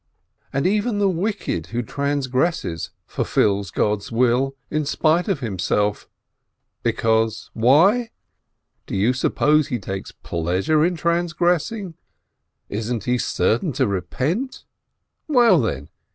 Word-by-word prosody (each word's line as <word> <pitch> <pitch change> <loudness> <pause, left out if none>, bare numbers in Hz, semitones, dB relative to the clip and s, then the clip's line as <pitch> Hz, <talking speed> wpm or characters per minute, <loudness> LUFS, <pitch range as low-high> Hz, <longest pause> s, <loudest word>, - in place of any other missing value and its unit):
And 140 - -1
even 210 +3 +1
the 205 -1 +3
wicked 190 - -2
who 120 +1 -3
transgresses 140 - -1 0.2
fulfils 100 -2 0
God's 105 +4 -1
will 125 +3 +2 0.2
in 155 0 0
spite 155 +5 +1
of 195 - -1
himself, 105 -1 -1 0.7
because 110 0 0
why? 180 - +4 0.8
Do - - -4
you 105 +6 +2
suppose 150 +3 +2
he 125 - -2
takes 95 -2 -6
pleasure 90 - 0
in 175 +2 +1
transgressing? 175 +3 0 0.7
Isn't 110 +1 -3
he 125 0 0
certain 130 - 0
to - - +1
repent? 130 - -2 0.6
Well, 240 - +5
then? 70 - -3
135 Hz, 110 wpm, -22 LUFS, 110-175 Hz, 0.8 s, Well